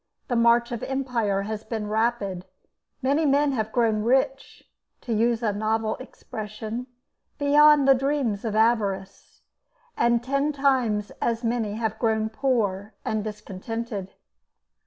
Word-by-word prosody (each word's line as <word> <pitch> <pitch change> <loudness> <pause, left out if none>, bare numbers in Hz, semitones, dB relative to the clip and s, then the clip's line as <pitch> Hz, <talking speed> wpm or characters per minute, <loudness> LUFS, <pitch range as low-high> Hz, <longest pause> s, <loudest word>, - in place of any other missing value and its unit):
The 245 - 0
march 235 +1 +4
of 235 - -4
empire 240 -7 -1
has 215 +1 -5
been 220 -2 -4
rapid; 215 -4 -1 0.6
many 280 +4 +2
men 285 0 +3
have 220 -4 -2
grown 225 -3 +2
rich, 265 +4 0 0.4
to 235 - -3
use 230 +2 +1
a 210 -2 +1
novel 220 +1 0
expression, 220 -1 -7 0.5
beyond 295 0 +5
the 270 - +8
dreams 265 -6 -1
of 220 -2 -2
avarice, 200 -4 0 0.5
and 235 0 +2
ten 275 +3 0
times 255 -7 +1
as 230 0 0
many 230 -3 -1
have 220 -1 -2
grown 220 -2 +1
poor 215 -5 -1
and 215 -1 -1
discontented. 210 0 -6
230 Hz, 130 wpm, -25 LUFS, 215-255 Hz, 0.6 s, the